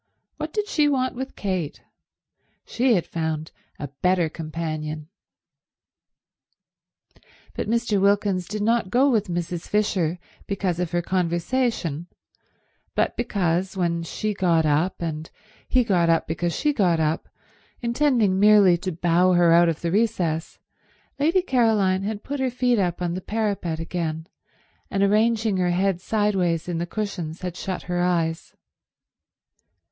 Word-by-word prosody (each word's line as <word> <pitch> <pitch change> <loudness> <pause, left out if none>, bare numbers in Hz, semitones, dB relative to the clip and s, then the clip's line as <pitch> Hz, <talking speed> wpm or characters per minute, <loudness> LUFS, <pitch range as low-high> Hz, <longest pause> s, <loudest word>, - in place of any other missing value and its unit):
What 310 0 -4
did 420 +3 -2
she 300 -7 +2
want 260 -2 0
with 265 +2 -6
Kate? 185 -7 -3 0.8
She 245 -1 +2
had 175 - 0
found 160 -1 -3 0.3
a 145 - -5
better 180 -3 +2
companion. 155 -1 -5 2.4
But - - -4
Mr. 230 -3 +1
Wilkins 200 -2 +2
did 210 0 -3
not 230 -2 +1
go 265 +6 +3
with 215 -4 +1
Mrs. 175 -1 -4
Fisher 185 -5 0 0.3
because 190 -3 -1
of 180 -2 -1
her 175 +1 -1
conversation, 175 - -1 0.9
but - - +1
because, 190 -5 -1
when 170 -2 0
she 210 +5 -3
got 170 -5 +2
up 155 +5 +1
and 160 -1 -4 0.4
he 255 -1 +3
got 180 -7 +2
up 165 -1 +3
because 170 +2 -2
she 300 -1 +1
got 180 - +2
up, 155 +1 -1 0.5
intending 235 -6 +2
merely 205 -4 +6
to 185 +2 -4
bow 175 +2 +2
her 175 -1 +4
out 170 0 +6
of 160 - -3
the 170 - -1
recess, 180 -6 0 0.6
Lady 330 +6 +3
Caroline 220 - +2
had 205 +1 -4
put 285 0 -4
her 260 -1 +1
feet 245 -2 +1
up 180 -2 -1
on 170 -1 -1
the 185 - -4
parapet 200 -6 -2
again, 165 -1 -3 0.6
and 195 - 0
arranging 215 0 +2
her 180 -1 +1
head 185 0 +1
sideways 190 -6 0
in 170 -2 -2
the 170 - -2
cushions 180 -6 -4
had 180 -2 -4
shut 185 0 -4
her 175 0 -2
eyes. 165 -2 -1
185 Hz, 140 wpm, -24 LUFS, 170-215 Hz, 2.4 s, merely